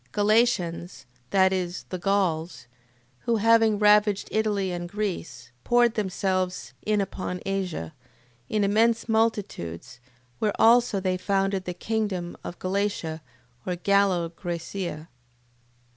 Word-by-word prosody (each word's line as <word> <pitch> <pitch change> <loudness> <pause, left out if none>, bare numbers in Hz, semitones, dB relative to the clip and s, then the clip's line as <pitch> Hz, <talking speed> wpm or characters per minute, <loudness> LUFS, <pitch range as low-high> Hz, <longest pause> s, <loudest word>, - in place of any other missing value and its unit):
Galatians... 205 - +1 0.2
That 190 -1 +4
is, 180 -1 -3
the 185 - -4
Gauls, 180 -4 0 0.5
who 235 - 0
having 225 0 +4
ravaged 210 -1 +4
Italy 210 -3 0
and 175 0 -4
Greece, 175 - -4
poured 240 -1 +3
themselves 185 -3 -2
in 210 -1 +1
upon 185 -2 -3
Asia, 185 - -3 0.6
in 215 -1 +1
immense 225 +3 +2
multitudes, 205 - -1 0.4
where 210 -2 -1
also 230 -2 +5
they 185 -1 0
founded 195 0 0
the 180 - -4
kingdom 205 -5 -2
of 175 - -7
Galatia 185 -4 -2 0.4
or 180 - -2
Gallo 190 -2 +2
Graecia. 170 -1 -5
195 Hz, 115 wpm, -26 LUFS, 180-215 Hz, 0.6 s, also